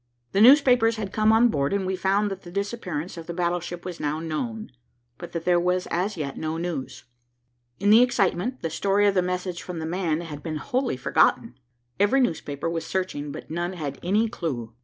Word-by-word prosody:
The 195 Hz, -, +2 dB
newspapers 245 Hz, -3 st, +6 dB
had 210 Hz, -3 st, -5 dB
come 215 Hz, 0 st, +3 dB
on 230 Hz, +2 st, +5 dB
board, 140 Hz, -4 st, 0 dB
and 200 Hz, -1 st, 0 dB
we 190 Hz, 0 st, -1 dB
found 195 Hz, +2 st, +1 dB
that 195 Hz, 0 st, -6 dB
the 175 Hz, -, -11 dB
disappearance 185 Hz, -4 st, -4 dB
of 165 Hz, -, -8 dB
the 170 Hz, -, -5 dB
battleship 175 Hz, 0 st, -2 dB
was 180 Hz, -2 st, -6 dB
now 150 Hz, +1 st, -1 dB
known, 215 Hz, +8 st, -4 dB, 0.5 s
but 175 Hz, -, -8 dB
that 170 Hz, -1 st, -4 dB
there 175 Hz, -1 st, +4 dB
was 180 Hz, +1 st, 0 dB
as 185 Hz, +3 st, -1 dB
yet 140 Hz, -3 st, -4 dB
no 160 Hz, 0 st, -2 dB
news. 165 Hz, -6 st, -4 dB, 0.8 s
In 205 Hz, -, +3 dB
the 225 Hz, +3 st, +8 dB
excitement, 240 Hz, -1 st, +1 dB
the 165 Hz, -, -2 dB
story 200 Hz, +4 st, +2 dB
of 200 Hz, -, +4 dB
the 185 Hz, -, +3 dB
message 180 Hz, 0 st, -3 dB
from 180 Hz, -2 st, -7 dB
the 160 Hz, -, -4 dB
man 165 Hz, -1 st, -1 dB
had 150 Hz, -4 st, -7 dB
been 155 Hz, -1 st, -4 dB
wholly 255 Hz, -, -1 dB
forgotten. 125 Hz, -, +2 dB, 0.5 s
Every 205 Hz, +7 st, +4 dB
newspaper 160 Hz, -, -1 dB
was 165 Hz, -1 st, -2 dB
searching, 165 Hz, -6 st, -3 dB
but -, -, -9 dB
none 175 Hz, +2 st, -2 dB
had 145 Hz, -6 st, -5 dB
any 210 Hz, +6 st, +2 dB
clue. 125 Hz, -, -4 dB
180 Hz, 200 wpm, -25 LUFS, 165-205 Hz, 0.8 s, the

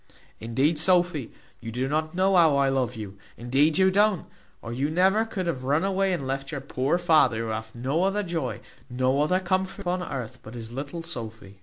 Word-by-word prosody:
Indeed, 135 Hz, +8 st, +1 dB
Sophy, 175 Hz, -6 st, +2 dB, 0.3 s
you 115 Hz, -1 st, -7 dB
do 125 Hz, +3 st, -2 dB
not 155 Hz, +3 st, -1 dB
know 190 Hz, +1 st, +3 dB
how 165 Hz, -5 st, +5 dB
I 140 Hz, -1 st, +3 dB
love 130 Hz, -2 st, 0 dB
you, 100 Hz, -3 st, -8 dB, 0.2 s
indeed 135 Hz, +7 st, +2 dB
you 190 Hz, 0 st, +4 dB
don't, 205 Hz, -2 st, +2 dB, 0.3 s
or 115 Hz, -, -7 dB
you 135 Hz, +4 st, -1 dB
never 190 Hz, +7 st, +3 dB
could 200 Hz, -5 st, -4 dB
have 155 Hz, -7 st, -2 dB
run 145 Hz, +6 st, +1 dB
away 195 Hz, 0 st, +1 dB
and 170 Hz, -7 st, -2 dB
left 135 Hz, +2 st, -3 dB
your 145 Hz, -, -3 dB
poor 135 Hz, +3 st, -1 dB
father, 155 Hz, -9 st, +4 dB
who -, -, -4 dB
hath 110 Hz, +1 st, -5 dB
no 135 Hz, +8 st, 0 dB
other 205 Hz, +2 st, 0 dB
joy, 165 Hz, -8 st, -3 dB, 0.3 s
no 130 Hz, +3 st, +1 dB
other 180 Hz, +5 st, +2 dB
comfort 190 Hz, +2 st, -1 dB
upon 180 Hz, -1 st, -1 dB
earth, 125 Hz, -6 st, -5 dB
but 110 Hz, +1 st, -11 dB
his 115 Hz, -1 st, -7 dB
little 145 Hz, +6 st, -5 dB
Sophy." 110 Hz, -, -8 dB
145 Hz, 200 wpm, -26 LUFS, 125-180 Hz, 0.3 s, how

